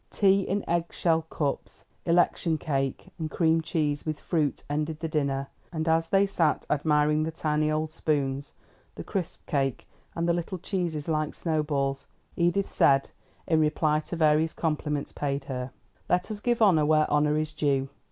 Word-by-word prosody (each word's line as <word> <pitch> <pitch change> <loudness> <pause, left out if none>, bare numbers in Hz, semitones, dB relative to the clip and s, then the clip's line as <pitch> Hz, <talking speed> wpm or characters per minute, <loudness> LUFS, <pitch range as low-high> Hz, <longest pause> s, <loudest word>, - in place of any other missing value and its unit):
Tea 195 -1 +3
in 195 +1 -2
egg 170 0 +1
shell 165 -2 +1
cups, 145 -3 -3 0.2
election 170 -1 +2
cake 135 -4 -2
and 160 -1 -2
cream 165 0 +2
cheese 150 -3 -1
with 155 -2 -3
fruit 155 -5 -1
ended 150 +1 -2
the 165 - -2
dinner; 140 -3 -1 0.3
and 160 -1 -3
as 165 0 +2
they 195 0 +4
sat 170 -6 +1
admiring 150 0 +2
the 155 - 0
tiny 155 -1 0
old 155 0 -1
spoons, 140 -3 -1 0.4
the - - -6
crisp 185 -5 -4
cake, 135 -5 -1 0.3
and 170 0 -1
the 170 - +3
little 175 +2 -3
cheeses 170 -5 -3
like 155 -2 -1
snow 160 -3 0
balls, 140 -2 -2 0.3
Edith 175 +3 +1
said, 135 0 +3 0.3
in 160 -2 +2
reply 155 0 +2
to 155 - -6
various 155 0 +3
compliments 150 -2 -2
paid 140 -1 -2
her: 130 -2 -4 0.4
"Let 180 +4 +1
us 210 - -4
give 240 +1 +1
honor 175 -7 +5
where 155 0 +4
honor 150 0 +3
is 155 0 -2
due. 140 -3 +1
155 Hz, 170 wpm, -27 LUFS, 150-170 Hz, 0.4 s, honor